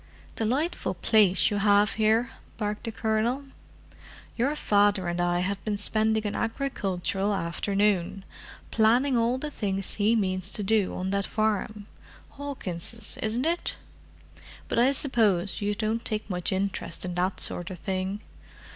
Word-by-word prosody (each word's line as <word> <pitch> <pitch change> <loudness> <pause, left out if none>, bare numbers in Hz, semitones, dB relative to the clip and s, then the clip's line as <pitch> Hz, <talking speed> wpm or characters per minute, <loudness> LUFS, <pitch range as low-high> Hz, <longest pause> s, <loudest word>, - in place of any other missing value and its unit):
"Delightful 260 +10 -1
place 210 -4 +4
you 205 - 0
have 205 0 +4
here!" 220 +2 +2 0.3
barked 210 -1 -3
the 230 - -2
Colonel. 220 +5 0 0.9
"Your 270 +6 +1
father 205 -7 +3
and 175 0 -1
I 175 0 +1
have 195 +2 -2
been 210 -2 -1
spending 220 +1 +1
an 205 - -2
agricultural 200 -5 -1
afternoon; 195 +2 0 0.5
planning 245 +5 +4
all 235 +2 +2
the 295 +3 -5
things 195 -6 -2
he 215 +2 +2
means 185 -3 0
to 210 - -1
do 210 -1 +2
on 185 +1 -2
that 200 -1 0
farm—Hawkins', 215 0 -4
isn't 225 +5 -1
it? 340 +2 -1 0.9
But - - 0
I 250 +3 +5
suppose 215 - +1
you 205 0 0
don't 220 +2 -1
take 215 -1 -3
much 180 -3 -1
interest 195 0 -2
in 180 - -3
that 180 +2 0
sort 175 +1 -2
of 185 - -6
thing? 190 +3 -3
210 Hz, 140 wpm, -27 LUFS, 190-225 Hz, 0.9 s, I